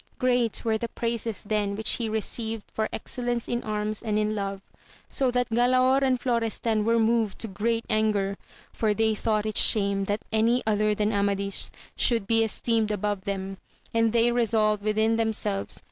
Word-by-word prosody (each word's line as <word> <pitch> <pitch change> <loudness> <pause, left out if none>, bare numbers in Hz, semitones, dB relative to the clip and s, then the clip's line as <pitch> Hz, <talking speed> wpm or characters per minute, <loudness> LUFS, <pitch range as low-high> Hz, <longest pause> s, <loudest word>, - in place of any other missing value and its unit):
Great 245 -3 0
were 220 -1 +1
the 235 - -2
praises 230 -2 -3
then 205 -1 -1
which 220 +1 +1
he 230 -2 -2
received 220 0 -2
for 220 0 -1
exceUence 240 0 -2
in 240 0 -1
arms 215 -1 -2
and 215 -3 -1
in 215 0 0
love, 200 -2 -3 0.5
so 265 -2 0
that 245 0 0
Galaor 255 +3 +3
and 260 -2 +2
Florestan 230 -3 0
were 230 +2 +2
moved 225 -2 +1
to 225 - -2
great 225 +3 -1
anger, 210 -2 +1 0.4
for 215 -2 0
they 220 0 +2
thought 215 0 -1
it 215 -1 -2
shame 200 -2 +4
that 205 +2 -3
any 230 +3 +2
other 215 -1 +1
than 210 +1 0
Amadis 200 -1 +1 0.3
should 230 -4 +2
be 225 +2 +3
esteemed 225 0 0
above 205 -1 -2
them, 195 -1 -4 0.4
and 230 -1 +2
they 235 +1 +3
resolved 220 -3 +1
within 220 +2 +1
themselves 215 -3 -2
th? - - -8
220 Hz, 175 wpm, -26 LUFS, 210-230 Hz, 0.5 s, shame